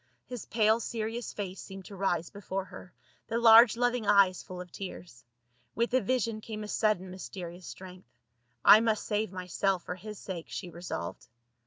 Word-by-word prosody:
His 245 -3 -7
pale 220 0 +3
seri 225 0 -3
ous 240 - -6
face 195 -2 -5
seemed 195 -1 -10
to 200 - -10
rise 175 -3 -1
before 195 -1 -4
her, 185 - -12 0.4
the 230 - -1
large 230 0 +8
loving 245 -2 +1
eyes 195 -3 +5
full 180 -1 -9
of 180 -1 -9
tears. 175 -10 -8 0.5
With 235 +2 0
the 255 +1 +3
vision 230 0 -1
came 215 -1 -6
a - - -6
sudden 210 -4 0
mysterious 180 -2 -8
strength. 185 0 -11 0.6
I 215 - +10
must 220 -2 0
save 210 -2 -1
myself 185 0 -1
for - - -4
his 210 +3 -9
sake, 180 -5 -6
she 180 -3 -6
resolved. 170 - -6
200 Hz, 175 wpm, -30 LUFS, 180-220 Hz, 0.6 s, I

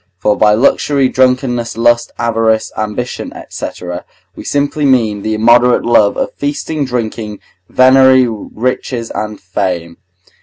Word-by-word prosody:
For 105 +2 +1
by 105 -1 +3
luxury, 135 +3 +2
drunkenness, 125 -3 0
lust, 120 0 +2
avarice, 115 -1 0
ambition, 110 +3 -4 0.2
&c., - - -5 0.7
we - - -9
simply 145 +1 -1
mean 115 -7 +2
the 110 +1 -2
immoderate 120 +3 +4
love 110 -3 +3
of - - -2
feasting, 145 +1 -3
drinking, 110 -4 -4 0.3
venery, 130 0 +5
riches, 115 +1 -4
and 105 0 -5
fame. 90 -2 -3
120 Hz, 120 wpm, -14 LUFS, 110-130 Hz, 0.7 s, venery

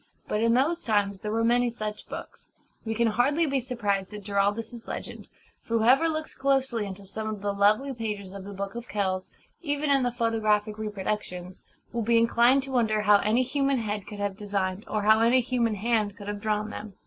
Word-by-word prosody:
But 210 - -1
in 230 +1 +3
those 320 +7 +2
times 205 - 0
there 210 - -3
were 225 +1 +1
many 240 +1 +3
such 215 -2 -6
books. - - -9 0.4
We 225 0 -2
can 235 +1 +2
hardly 280 +9 +2
be 275 -2 +1
surprised 210 -6 -2
at 210 - -8
Giraldus's 205 +4 -1
legend; - - -6 0.3
for 230 - -1
whoever 260 +9 +4
looks 315 0 -3
closely 265 -5 0
into 195 +1 -8
some 215 +3 -4
of 210 -2 -6
the 205 -1 0
lovely 215 +7 +3
pages 210 -5 -5
of 200 -1 -7
the 200 - -8
Book 195 0 -4
of 235 +1 -7
Kells 190 -2 -1 0.3
even 290 -2 0
in 275 -1 +4
the 245 -1 +1
photographic 215 -3 0
reproductions 195 -3 -4 0.3
will 235 - -1
be 230 +1 +3
inclined 235 +3 +4
to 270 - -7
wonder 220 -4 +2
how 205 0 +6
any 220 +5 +2
human 275 +1 +1
head 210 -3 -3
could 210 - -8
have 205 -1 -2
designed, 200 -2 -2
or 210 -1 -1
how 215 +1 +6
any 235 +3 +5
human 235 -3 0
hand 210 -1 0
could 205 - -9
have 205 0 -4
drawn 215 0 -1
them. 210 -3 -8
220 Hz, 205 wpm, -27 LUFS, 205-245 Hz, 0.4 s, how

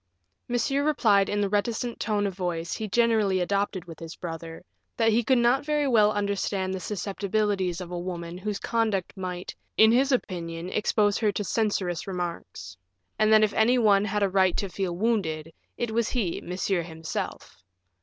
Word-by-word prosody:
Monsieur 250 +4 0
replied 215 -10 +3
in 205 0 0
the 200 - +2
reticent 220 +4 -1
tone 210 -2 0
of 195 - -2
voice 175 -2 -3
he 220 - -3
generally 215 -3 +2
adopted 195 0 -1
with 165 -2 -11
his 165 0 -8
brother, 165 0 -7 0.3
that 225 -1 +3
he 235 +2 +2
could 260 +3 +3
not 240 +3 +3
very 295 -1 0
well 215 -5 +5
understand 200 -2 -1
the 190 - -3
susceptibilities 200 -2 -1
of 180 -1 -7
a 175 - -3
woman 175 -1 -5
whose 200 +2 -3
conduct 215 -4 -1
might, 185 -2 -5 0.2
in 220 0 +7
his 265 +4 +3
opinion, 170 -7 -2
expose 210 -1 +2
her 215 -2 +2
to 205 - -3
censorious 200 -6 -1
remarks, 170 - -5 0.4
and 215 0 +4
that 215 0 +7
if 210 - +2
any 240 +3 +4
one 205 -4 +4
had 210 0 0
a - - +4
right 190 -1 +2
to 200 - -2
feel 180 -2 -3
wounded, 165 -8 -1 0.2
it 240 -2 -2
was 230 0 +1
he, 215 -10 -1
Monsieur 180 0 -1
himself. 160 - -6
200 Hz, 175 wpm, -26 LUFS, 180-220 Hz, 0.4 s, in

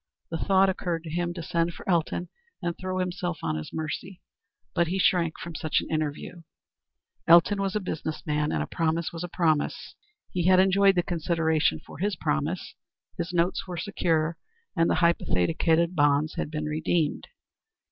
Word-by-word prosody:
The 165 - -1
thought 195 +1 +4
occurred 175 -3 -2
to 160 - -7
him 175 +1 -1
to 170 - -5
send 170 +1 0
for - - -12
Elton 175 0 0 0.3
and 170 -3 -2
throw 185 0 -4
himself 180 -2 -2
on 80 - -1
his 75 0 -5
mercy, 160 +4 -5 0.5
but 170 - +2
he 185 +4 -1
shrank 175 -3 +2
from 170 - -7
such 155 -1 0
an - - -7
interview. 155 +2 -3 0.9
Elton 170 +5 +6
was 195 0 -1
a - - +2
business 160 -5 -4
man, 150 -1 0
and - - 0
a - - -4
promise 165 0 -1
was 165 0 -5
a - - -3
promise. 160 -4 0 0.4
He 180 -1 0
had 185 0 +6
enjoyed 195 +1 +5
the 175 - +2
consideration 160 - +1
for - - -11
his 200 +1 0
promise; 75 0 -2 0.5
his 175 - -2
notes 175 +2 0
were 180 -1 -5
secure 165 -3 0 0.4
and 165 -2 +3
the - - +2
hypothecated 165 - +2
bonds 145 0 +3
had - - -3
been 155 -1 -3
redeemed. 155 +1 0
170 Hz, 175 wpm, -27 LUFS, 155-180 Hz, 0.9 s, Elton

